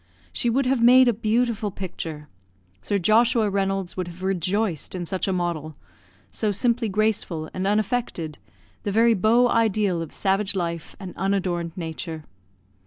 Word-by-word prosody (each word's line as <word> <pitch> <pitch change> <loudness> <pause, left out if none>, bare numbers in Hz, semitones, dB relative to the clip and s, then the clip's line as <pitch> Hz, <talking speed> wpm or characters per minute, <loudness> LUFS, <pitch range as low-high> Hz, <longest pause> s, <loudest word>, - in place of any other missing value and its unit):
She 240 - 0
would 265 +3 +1
have 255 -1 +1
made 250 +2 +7
a 240 - +4
beautiful 220 0 0
picture; 165 -6 -6 0.5
Sir 205 - 0
Joshua 220 +3 +3
Reynolds 195 -2 -1
would 185 -2 -3
have 175 +2 -10
rejoiced 190 -1 -1
in 175 -1 -3
such 185 +3 -2
a - - +1
model 170 -4 -2 0.6
so 215 -2 -1
simply 235 +2 0
graceful 195 -6 -1
and 185 +1 -2
unaffected, 210 - -1 0.4
the 205 - -2
very 230 +3 +4
beau 225 +5 +4
ideal 215 -6 +1
of 165 - -6
savage 195 +1 0
life 170 -3 -3
and 190 -3 -8
unadorned 180 -3 -1
nature. 160 -1 -5
195 Hz, 150 wpm, -24 LUFS, 175-225 Hz, 0.6 s, made